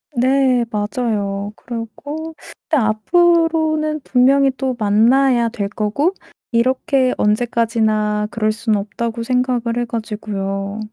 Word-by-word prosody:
네 255 0 +3
맞아요. 205 -2 -2
그리고 285 +9 -7 0.4
근데 295 -8 +3
앞으로는 315 +5 +2
분명히 270 +2 +3
또 260 -2 -1
만나야 235 +3 +3
될 205 -3 -4
거고 220 - 0 0.4
이렇게 255 +2 +1
언제까지나 215 -1 +1
그럴 215 -1 0
순 220 0 -1
없다고 230 +3 -4
생각을 250 -1 0
해 240 - 0
가지고요. 205 -3 -4
235 Hz, 245 characters per minute, -18 LUFS, 215-270 Hz, 0.4 s, 네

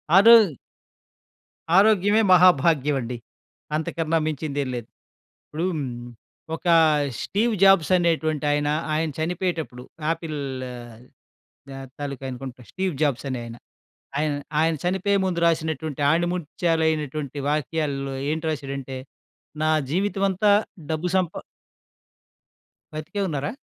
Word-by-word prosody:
ఆ - - +10
రో 230 - +10 1.5
ఆరోగ్యమే 205 +1 +4
మహాభాగ్యవండి. 145 -8 +3 0.6
అంతకన్నా 160 +1 -1
మించిందేం 145 -2 -2
లేదు. 120 -2 -6 0.6
ఇప్పుడు 160 +4 -3
హ్మ్, 145 -3 -2 0.7
ఒకా 170 0 +1 0.5
స్టీవ్ 220 +3 0
జాబ్స్ 195 -3 +5
అనేటువంటాయన, 155 -3 +1 0.2
ఆయన 160 0 0
చనిపోయేటప్పుడు 165 -6 -3 0.3
ఆపిల్ 165 -2 -4 0.3
ఆహ్, 120 0 -13 0.7
తాలూకా 140 -2 -5
అనుకుంటా. 125 0 -8
స్టీవ్ 185 -2 -2
జాబ్స్ 140 -2 0
అనే 130 - -3
ఆయన. 115 0 -9 0.6
ఆయన 150 -1 +1 0.3
ఆయన 165 0 +2
చనిపోయే 190 +2 +1
ముందు 180 -2 -1
రాసినటువంటి 160 -3 -1
ఆణిముత్యాలైనటువంటి 160 -4 -1
వాక్యాల్లో 145 -2 -2 0.2
ఏంటి 160 +1 -2
రాసాడంటే, 135 -3 -5 0.7
నా 155 - +2 0.2
జీవితమంతా 195 +2 +1 0.4
డబ్బు 160 +3 -1
సంప 180 -3 +1 1.6
బతికే 155 +7 -4
ఉన్నారా? 145 +4 -2
155 Hz, 95 wpm, -24 LUFS, 140-175 Hz, 1.6 s, ఆ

